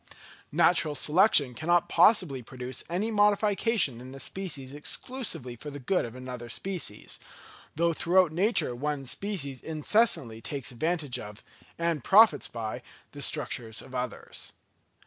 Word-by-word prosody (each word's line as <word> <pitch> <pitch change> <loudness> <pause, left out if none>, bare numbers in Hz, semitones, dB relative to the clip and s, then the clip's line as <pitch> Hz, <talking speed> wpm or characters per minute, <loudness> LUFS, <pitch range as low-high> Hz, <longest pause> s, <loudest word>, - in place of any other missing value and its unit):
Natural 160 -1 +3
selection 150 - +4
cannot 170 +7 +1
possibly 175 - +4
produce 125 +1 -6
any 195 +7 -1
modification 205 - +2
in 130 +2 -10
a - - -9
species 140 -7 -5
exclusively 150 - -3
for 150 +6 -8
the 145 - -7
good 145 +6 0
of 115 0 -9
another 125 -2 -7
species; 170 - -5 0.6
though 170 +2 +2
throughout 175 +1 +3
nature 180 - +1
one 145 +1 -3
species 140 - -4
incessantly 155 - +1
takes 135 +1 -4
advantage 155 +1 -2
of, 105 +1 -10 0.3
and 170 -5 -1
profits 200 - +6
by 110 -2 -5 0.3
the - - -9
structures 110 -2 -1
of 130 - -12
others. 125 -1 -6
150 Hz, 130 wpm, -28 LUFS, 125-185 Hz, 0.6 s, profits